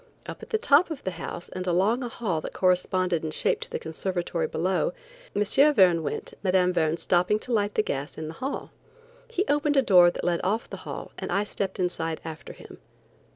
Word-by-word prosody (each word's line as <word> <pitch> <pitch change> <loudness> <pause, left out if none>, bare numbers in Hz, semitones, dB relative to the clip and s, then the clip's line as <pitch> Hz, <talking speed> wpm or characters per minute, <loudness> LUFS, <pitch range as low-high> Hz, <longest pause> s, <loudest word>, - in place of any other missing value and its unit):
Up - - -8
at - - -10
the 450 - +1
top 320 -4 +4
of 315 -4 -6
the 185 - -2
house 170 0 -7
and 185 0 -5
along 195 +8 +2
a 245 - -3
hall 190 -9 -2
that - - -7
corresponded 185 -2 +1
in 160 - -2
shape 155 - +1
to - - -7
the - - -3
conservatory 170 0 -2
below, 190 - 0 0.4
M. 205 - +3 0.3
Verne 180 -5 +5
went, 155 - -4
Mme. 185 -1 +3
Verne 160 -2 +1
stopping 180 +4 +2
to 240 +3 -5
light 205 -2 +1
the 215 - +3
gas 140 -4 -4
in 155 0 -5
the 160 - -6
hall. 270 +2 -4 0.6
He 385 - -1
opened 295 0 +2
a 270 - +5
door 180 -6 +7
that - - -6
led 175 -1 +1
off 210 +5 0
the - - -7
hall - - -6
and - - -4
I 200 - +2
stepped 195 -2 -4
inside 165 -3 -1
after 160 -1 -7
him. - - -13
185 Hz, 210 wpm, -26 LUFS, 170-215 Hz, 0.6 s, door